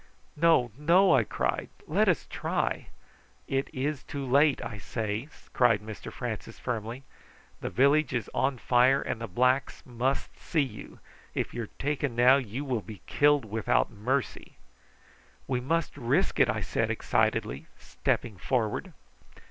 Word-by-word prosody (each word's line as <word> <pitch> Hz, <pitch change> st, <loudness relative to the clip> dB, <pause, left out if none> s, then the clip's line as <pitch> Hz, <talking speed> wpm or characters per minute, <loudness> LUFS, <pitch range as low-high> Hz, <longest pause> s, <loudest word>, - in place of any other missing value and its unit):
"No, 150 Hz, -7 st, +4 dB
no!" 170 Hz, +6 st, +4 dB
I 130 Hz, -4 st, +5 dB
cried. -, -, -2 dB, 0.2 s
"Let -, -, +2 dB
us -, -, +1 dB
try." -, -, -2 dB, 0.6 s
"It 135 Hz, 0 st, -1 dB
is 140 Hz, +2 st, -2 dB
too 140 Hz, -1 st, -5 dB
late, 140 Hz, +3 st, +4 dB
I 105 Hz, -3 st, -6 dB
say," 110 Hz, +4 st, -3 dB, 0.3 s
cried 120 Hz, -4 st, +4 dB
Mr 105 Hz, 0 st, -8 dB
Francis 120 Hz, -4 st, -5 dB
firmly. 120 Hz, +2 st, -4 dB, 0.6 s
"The -, -, -4 dB
village 140 Hz, +2 st, +3 dB
is 120 Hz, -5 st, -2 dB
on 135 Hz, 0 st, +1 dB
fire, 125 Hz, +3 st, +4 dB
and 115 Hz, -, -4 dB
the 115 Hz, -, -3 dB
blacks 125 Hz, +7 st, +1 dB
must 125 Hz, +2 st, -2 dB
see 155 Hz, -4 st, +1 dB
you. 115 Hz, -6 st, -9 dB, 0.4 s
If -, -, -2 dB
you 120 Hz, -1 st, -3 dB
are -, -, -18 dB
taken 140 Hz, -3 st, -1 dB
now 125 Hz, +3 st, +6 dB
you 130 Hz, +2 st, -4 dB
will 125 Hz, -5 st, -1 dB
be 105 Hz, -2 st, -11 dB
killed 145 Hz, -3 st, +3 dB
without 110 Hz, 0 st, +1 dB
mercy." 125 Hz, +6 st, -2 dB, 0.9 s
"We 125 Hz, -2 st, -1 dB
must 165 Hz, +6 st, -1 dB
risk 125 Hz, -4 st, 0 dB
it," -, -, +5 dB
I -, -, 0 dB
said -, -, -1 dB
excitedly, 65 Hz, +3 st, 0 dB
stepping 110 Hz, -5 st, -2 dB
forward. 110 Hz, 0 st, -1 dB
125 Hz, 150 wpm, -28 LUFS, 115-140 Hz, 0.9 s, now